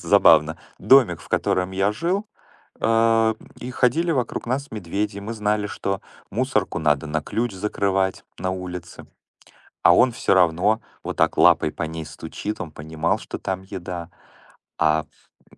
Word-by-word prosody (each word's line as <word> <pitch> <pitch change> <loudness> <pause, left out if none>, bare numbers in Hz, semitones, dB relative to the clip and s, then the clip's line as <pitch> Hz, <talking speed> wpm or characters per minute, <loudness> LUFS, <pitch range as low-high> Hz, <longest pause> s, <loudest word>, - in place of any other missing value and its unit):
забавно, 80 +1 +5 0.2
домик, 115 -12 +5
в - - -15
котором 90 0 0
я 95 +2 +1
жил, 180 - -1 0.5
а, 115 0 +3
м, - - -16
и 125 - -5
ходили 135 +8 +2
вокруг 125 -3 -2
нас 135 +4 -2
медведи. 100 +1 -3
Мы 110 +3 -5
знали, 105 -1 0
что 95 -1 -3 0.3
мусорку - - 0
надо 75 0 +1
на 75 0 -2
ключ 115 +4 -2
закрывать 95 -1 -1
на 95 - -1
улице, 90 -2 -7 0.8
а 85 - +7
он 125 - +5
всё 110 - +1
равно 90 +4 +3 0.2
вот - - -5
так - - +2
лапой 75 -1 +5
по - - -5
ней 80 0 -5
стучит. 80 +7 -6
Он 80 - -6
понимал, 80 +2 -2
что - - -7
там 95 -1 -3
еда. 90 -3 -6 0.7
А, 80 0 +3 0.5
м, - - -20
95 Hz, 155 wpm, -23 LUFS, 85-115 Hz, 0.8 s, а